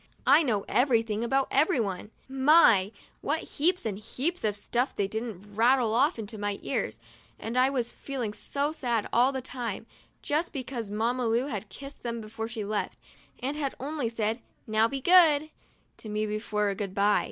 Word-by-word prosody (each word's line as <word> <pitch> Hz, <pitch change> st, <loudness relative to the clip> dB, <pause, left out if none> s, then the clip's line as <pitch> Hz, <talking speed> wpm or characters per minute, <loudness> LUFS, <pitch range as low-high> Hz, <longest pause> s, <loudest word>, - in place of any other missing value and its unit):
I 280 Hz, +5 st, +7 dB
know 220 Hz, -9 st, 0 dB
everything 230 Hz, -4 st, +2 dB
about 270 Hz, +3 st, +1 dB
everyone 230 Hz, -, +1 dB, 0.2 s
now. 265 Hz, 0 st, -4 dB
My! 225 Hz, -, +6 dB, 0.3 s
what 310 Hz, +3 st, 0 dB
heaps 350 Hz, +3 st, 0 dB
and 205 Hz, -3 st, -3 dB
heaps 280 Hz, +11 st, -3 dB
of 210 Hz, -2 st, +1 dB
stuff 240 Hz, +5 st, -1 dB
didn't 210 Hz, 0 st, -3 dB
they -, -, -17 dB
rattle 230 Hz, +2 st, +3 dB
off 280 Hz, +8 st, +3 dB
into 220 Hz, -1 st, -6 dB
my 205 Hz, -1 st, -2 dB
ears, 115 Hz, -5 st, -2 dB, 0.4 s
and 225 Hz, +2 st, -5 dB
I 255 Hz, +1 st, +4 dB
was 250 Hz, -4 st, -2 dB
feeling 250 Hz, -7 st, -4 dB
so 285 Hz, +6 st, -2 dB
sad 240 Hz, -8 st, -1 dB
all 250 Hz, +3 st, +4 dB
the 265 Hz, -2 st, -4 dB
time, 240 Hz, -5 st, -5 dB, 0.4 s
just 305 Hz, +4 st, -1 dB
because 250 Hz, -5 st, -5 dB
Mamma 230 Hz, +4 st, 0 dB
Lu 230 Hz, +3 st, +1 dB
had 215 Hz, -6 st, -5 dB
kissed 275 Hz, +8 st, -10 dB
them 235 Hz, -1 st, -3 dB
before 225 Hz, 0 st, -6 dB
she 225 Hz, -3 st, -5 dB
left, 210 Hz, 0 st, -2 dB, 0.5 s
and 275 Hz, +3 st, -1 dB
had 285 Hz, -3 st, -2 dB
only 280 Hz, -3 st, -2 dB
said, 225 Hz, +1 st, -2 dB, 0.2 s
'Now 220 Hz, +1 st, +3 dB
be 270 Hz, +3 st, -4 dB
good," 310 Hz, -3 st, +5 dB, 0.5 s
to 220 Hz, -, -9 dB
me 210 Hz, 0 st, -1 dB
for 210 Hz, -2 st, -1 dB
a -, -, -2 dB
good 195 Hz, -1 st, -5 dB
by. 205 Hz, +1 st, +4 dB
235 Hz, 180 wpm, -28 LUFS, 215-275 Hz, 0.5 s, I